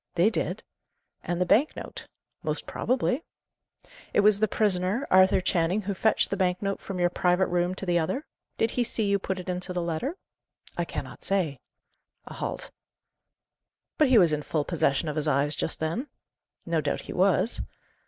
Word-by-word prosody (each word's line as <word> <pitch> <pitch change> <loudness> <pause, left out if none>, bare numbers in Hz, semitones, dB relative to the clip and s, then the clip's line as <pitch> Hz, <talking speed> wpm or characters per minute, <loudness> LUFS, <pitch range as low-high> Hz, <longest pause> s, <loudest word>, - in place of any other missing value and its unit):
"They 180 +6 +4
did." - - -2 0.6
"And 175 0 -2
the 180 - +2
bank 255 - +3
note?" - - -8 0.3
"Most - - -3
probably." 255 +3 0 0.9
"It - - +5
was 205 0 +5
the 215 - +3
prisoner, 200 +4 0
Arthur 185 0 +6
Channing, 180 +2 +1
who 200 0 -3
fetched 220 +3 +2
the - - +1
bank 185 -2 +1
note 195 -1 -2
from 195 - -5
your 175 0 +2
private 180 +1 +2
room 175 +1 0
to 195 - -5
the 175 -1 +2
other? 255 - -2 0.3
Did 225 - +1
he 245 - +1
see 225 -1 -1
you 200 0 +2
put 190 0 -3
it 180 - -8
into 180 0 -3
the 180 - -1
letter?" 170 - -2 0.6
"I - - -1
cannot - - -7
say." 170 -9 0 0.7
A - - -9
halt. - - -5 1.3
"But 305 - +6
he 255 -2 +5
was 175 -6 +5
in 150 - 0
full 150 0 -1
possession 155 -2 +1
of 150 0 -3
his 155 0 0
eyes 145 +1 +2
just - - -3
then?" 165 - -2 0.6
"No 165 -2 +1
doubt 145 -1 -1
he - - -8
was." 195 +5 +2
185 Hz, 185 wpm, -27 LUFS, 170-205 Hz, 1.3 s, Arthur